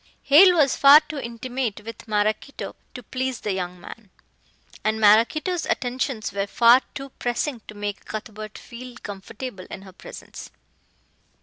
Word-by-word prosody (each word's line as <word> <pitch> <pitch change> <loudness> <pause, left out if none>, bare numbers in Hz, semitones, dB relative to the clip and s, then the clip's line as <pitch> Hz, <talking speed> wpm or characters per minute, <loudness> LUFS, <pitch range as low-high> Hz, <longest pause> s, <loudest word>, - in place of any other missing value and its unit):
Hale 355 +6 +7
was 285 -4 +4
far 285 +2 +8
too 305 -2 -7
intimate 235 -2 -4
with 230 0 -9
Maraquito 215 +5 -2 0.2
to 250 - -8
please 260 +2 -3
the 205 - -2
young 180 -1 -4
man. 210 +3 -12 0.7
And 220 0 0
Maraquito's 235 - +3
attentions 245 -4 -2
were 200 0 -2
far 235 +4 +6
too 275 0 -6
pressing 245 +1 -2
to 210 - -10
make 205 -1 -5
Cuthbert 215 0 -7
feel 245 0 -10
comfortable 205 0 -8
in 190 - -8
her 190 -2 -13
presence. - - -11
235 Hz, 140 wpm, -23 LUFS, 210-265 Hz, 0.7 s, far